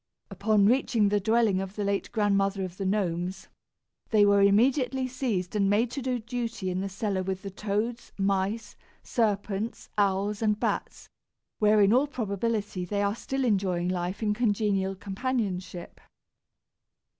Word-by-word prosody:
Upon 215 -2 +2
reaching 225 -2 +3
the 205 0 +2
dwelling 220 -2 +2
of 195 +1 -6
the 210 - -2
late 200 0 -1
Grandmother 200 -2 +1
of 185 -1 -6
the 195 - -2
Gnomes, 185 -2 -2 0.6
they 210 -2 +5
were 200 0 +5
immediately 255 +6 +3
seized 230 -8 -2
and 200 -2 +2
made 225 +4 +2
to 275 - -4
do 255 -1 -1
duty 230 -4 -4
in 185 +1 -2
the 195 - -3
cellar 195 0 -2
with 190 0 -4
the 195 - -6
toads, 215 +4 -3
mice, 200 +2 -1 0.3
serpents, 210 -1 -1
owls, 200 +1 +1
and 210 -1 +1
bats, - - -3 0.5
where 210 0 +5
in 200 +2 +5
all 265 +4 +4
probability 210 -5 -2
they 200 +3 -1
are 200 0 +1
still 270 +3 -3
enjoying 185 -5 +1
life 185 +3 -2
in 210 -1 +2
congenial 205 -4 0
companionship. 195 -4 -4
205 Hz, 150 wpm, -27 LUFS, 195-225 Hz, 0.6 s, they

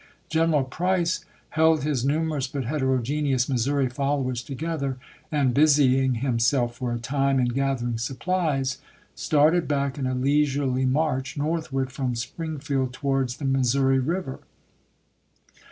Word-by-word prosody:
General 160 -3 +2
Price 175 +5 -1 0.2
held 160 -1 +3
his 145 -5 0
numerous 150 -1 0
but 135 0 -4
heterogeneous 130 0 0
Missouri 135 +1 +1
followers 135 -1 -1
together, 140 0 -3 0.3
and, 140 -5 +2
busying 135 -3 +4
himself 120 0 +1
for 125 -2 -3
a 120 - -1
time 135 +3 0
in 125 -1 +2
gathering 120 -3 -1
supplies, 135 0 -1 0.3
started 155 +3 +2
back 140 -1 -1
in 130 - -1
a 130 - -1
leisurely 135 -1 +1
march 135 +1 0
northward 145 -4 -2
from 130 -2 -2
Springfield 135 0 -3
to 140 - -11
wards 135 -2 0
the 145 - -5
Missouri 135 0 +2
River. 155 +1 -2
135 Hz, 125 wpm, -25 LUFS, 130-150 Hz, 0.3 s, busying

